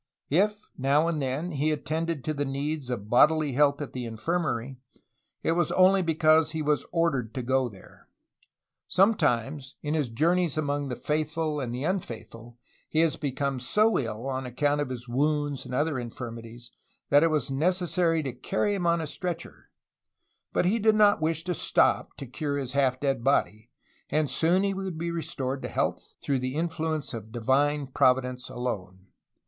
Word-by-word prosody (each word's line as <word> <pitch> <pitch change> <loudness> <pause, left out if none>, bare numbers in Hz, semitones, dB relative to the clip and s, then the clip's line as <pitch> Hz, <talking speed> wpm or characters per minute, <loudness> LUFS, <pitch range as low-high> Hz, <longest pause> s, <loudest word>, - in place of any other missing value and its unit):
If 210 +6 +1
now 140 +4 +3
and 160 -3 -1
then 140 +7 -2
he 150 0 0
attended 160 0 -2
to 155 - -1
the 145 -1 -1
needs 140 0 -3
of 110 -5 -4
bodily 150 +5 +4
health 140 +2 +2
at 145 - -9
the 125 -1 -4
infirmary, 125 +1 -2 0.7
it - - +2
was 170 -1 +1
only 190 +1 +5
because 160 -2 +3
he 160 -1 -2
was 150 0 0
ordered 135 -10 0
to 130 - -3
go 130 0 +1
there. 95 -3 -17 0.8
Sometimes, 145 - +1
in 150 0 -1
his 150 -6 0
journeys 165 +6 +1
among 145 -2 -1
the 125 - -3
faithful 155 +1 -1
and 125 -4 -3
the 125 +3 -4
unfaithful 120 - -5 0.3
he 160 - +2
has 165 -2 +2
become 140 -3 -2
so 210 - +2
ill, 115 0 -4
on 130 -1 -3
account 145 +4 0
of 135 -3 -3 0.2
wounds 145 +1 0
and 125 - -4
other 145 0 0
infirmities, 120 0 -8 0.4
that 145 - +7
it 165 - +4
was 150 -3 0
neces 175 +5 +1
sary 165 -3 +2
to 135 -3 -4
carry 195 - -1
him 180 -4 -1
on 170 0 +2
a - - -3
stretcher, 170 +2 -6 0.8
but - - +1
he 210 +6 +2
did 220 0 +4
not 205 -4 +5
wish 160 0 0
to 180 0 -1
stop - - +1
to 140 - -6
cure 140 +3 -3
his 135 -3 -4
half 130 -2 +1
dead 135 -4 -1
body; 115 -4 +1 0.4
and 150 -3 0
soon 175 +7 +2
he 200 0 +1
would 190 -3 -4
be 170 +1 -2
restored 135 -5 -3
to - - -4
health, - - -2
through 140 -2 -1
the 130 +1 -3
influence 160 -2 -2
of 115 -3 -5
the 110 +2 -7
Divine 140 +4 +2
Providence 125 -1 +1
alone. 95 -7 -5
145 Hz, 175 wpm, -27 LUFS, 130-165 Hz, 0.8 s, that